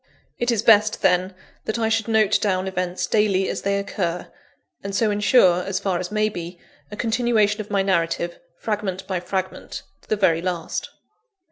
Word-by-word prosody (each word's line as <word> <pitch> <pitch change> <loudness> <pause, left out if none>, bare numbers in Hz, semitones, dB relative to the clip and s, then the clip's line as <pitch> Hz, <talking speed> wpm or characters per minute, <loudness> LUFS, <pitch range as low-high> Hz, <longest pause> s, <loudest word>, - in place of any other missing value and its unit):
It 240 - 0
is 225 -3 +1
best, 215 -2 +4
then, 185 +1 +2 0.3
that 220 - -2
I 225 -1 +1
should 225 0 0
note 215 -2 +3
down 190 -2 0
events 180 -1 -2
daily 200 -3 +2
as - - -3
they 200 0 0
occur; 180 -3 -3 0.5
and 200 0 -4
so 215 0 +2
ensure, 205 -3 +4
as 190 0 -2
far 190 -3 -1
as 180 - -4
may 215 0 +2
be, 175 -3 -7 0.3
a 210 - -7
continuation 225 -2 +1
of 210 - -10
my 200 -2 +1
narrative, 170 -2 -1 0.2
fragment 200 -3 -3
by 190 -2 -2
fragment, 185 +1 -4 0.2
to - - -26
the - - +2
very 170 -5 +2
last. 175 -2 -3
200 Hz, 175 wpm, -22 LUFS, 185-215 Hz, 0.5 s, best